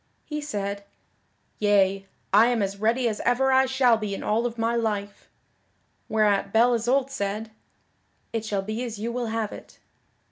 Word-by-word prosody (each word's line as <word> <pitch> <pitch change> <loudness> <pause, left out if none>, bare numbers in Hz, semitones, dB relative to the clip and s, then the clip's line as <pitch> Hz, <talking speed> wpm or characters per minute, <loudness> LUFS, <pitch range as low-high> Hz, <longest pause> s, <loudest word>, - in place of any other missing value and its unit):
He 300 -1 -4
said, 200 -7 -4 0.8
"Yea, 195 -2 +2 0.3
I 215 +3 +7
am 240 -4 +1
as 195 0 -3
ready 235 +4 +1
as 215 -2 -2
ever 265 +2 +2
I 265 0 +4
shall 255 -3 +3
be 210 -2 -3
in - - -7
all 225 +3 +1
of 235 0 -8
my 230 +1 0
life." 205 -3 -3 0.8
Whereat 210 -2 +2
Belle 235 +3 +4
Isoult 255 +4 +1
said, 210 -1 -3 0.8
"It 225 -2 -2
shall 205 -3 -2
be 215 +4 -4
as 230 -3 -5
you 225 +3 -3
will 245 0 -3
have 220 -1 -2
it." - - -12
225 Hz, 170 wpm, -25 LUFS, 205-240 Hz, 0.8 s, I